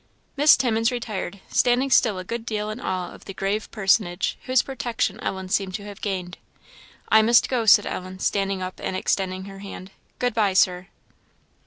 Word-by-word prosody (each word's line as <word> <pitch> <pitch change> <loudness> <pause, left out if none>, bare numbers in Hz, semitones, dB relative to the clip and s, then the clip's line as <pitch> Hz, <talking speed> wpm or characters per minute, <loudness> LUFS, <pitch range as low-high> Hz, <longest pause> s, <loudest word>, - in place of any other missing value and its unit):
Miss 295 +2 +6
Timmins 225 -2 +1
retired, 210 -5 -5
standing 250 +2 +2
still 220 -5 +4
a 185 - -5
good 230 +4 -5
deal 215 -2 -3
in 215 - -7
awe 185 -6 -3
of - - -15
the 195 - -8
grave 200 +3 -2
personage 195 -3 +1
whose 255 -1 +3
protection 235 -5 -2
Ellen 190 -3 -4
seemed 190 0 -1
to 205 - -5
have 205 -1 -10
gained. 185 -3 -4 0.7
"I 220 - +6
must 235 +2 +4
go," 240 -4 -1
said 205 0 +7
Ellen, 185 0 -5
standing 195 0 -1
up 185 0 -6
and 190 - -2
extending 185 0 -1
her 195 0 -10
hand; 195 -1 -9 0.3
"good 245 -1 0
bye, 210 -4 +2
Sir." 180 0 +2
200 Hz, 180 wpm, -24 LUFS, 190-230 Hz, 0.7 s, said